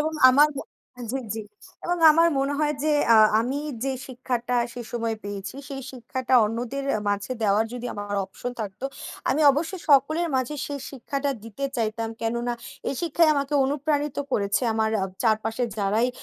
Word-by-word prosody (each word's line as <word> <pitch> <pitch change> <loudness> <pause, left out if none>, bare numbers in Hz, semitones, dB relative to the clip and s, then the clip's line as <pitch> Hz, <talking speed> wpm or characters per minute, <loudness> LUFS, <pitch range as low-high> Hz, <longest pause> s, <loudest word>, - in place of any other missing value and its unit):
এবং 315 +1 0 0.2
আমার 295 +3 +6 0.6
জ্বী, 270 - -1
জ্বী 220 -1 -5 0.4
এবং 350 0 0
আমার 330 +2 +5
মনে 275 +1 +1
হয় 300 -1 +1
যে, 305 - +3 0.2
আ - - +8 0.2
আমি 260 +5 -1 0.3
যে, 270 - 0
শিক্ষাটা 250 -1 -2 0.2
সে 245 - -7
সময় 230 -2 -1
পেয়েছি, 200 +4 -6
সেই 270 -1 -6
শিক্ষাটা 260 0 -2
অন্যদের 240 +5 -3
এ - - -2
মাঝে 205 +5 -1
দেওয়ার 210 +1 +3
যদি 245 0 -5
আমার 205 0 -4
option 245 +5 -6
থাকতো 205 +4 -6 0.5
আমি 290 +4 +1
অবশ্যই 330 +5 -3
সকলের 310 +5 +4
মাঝে 260 +3 -1
সেই 285 -1 -5
শিক্ষাটা 275 +2 -3
দিতে 230 +5 -6
চাইতাম। 225 0 -1
কেননা 235 +1 -1 0.4
এই - - -2
শিক্ষাই 335 0 +3
আমাকে 280 +1 -1
অনুপ্রাণিত 290 +1 -1 0.2
করেছে। 200 +3 +1
আমার 220 0 +1
আ - - +2 0.2
চারপাশের 225 +2 +1
যারাই 210 +5 +2
255 Hz, 165 wpm, -25 LUFS, 225-285 Hz, 0.6 s, আ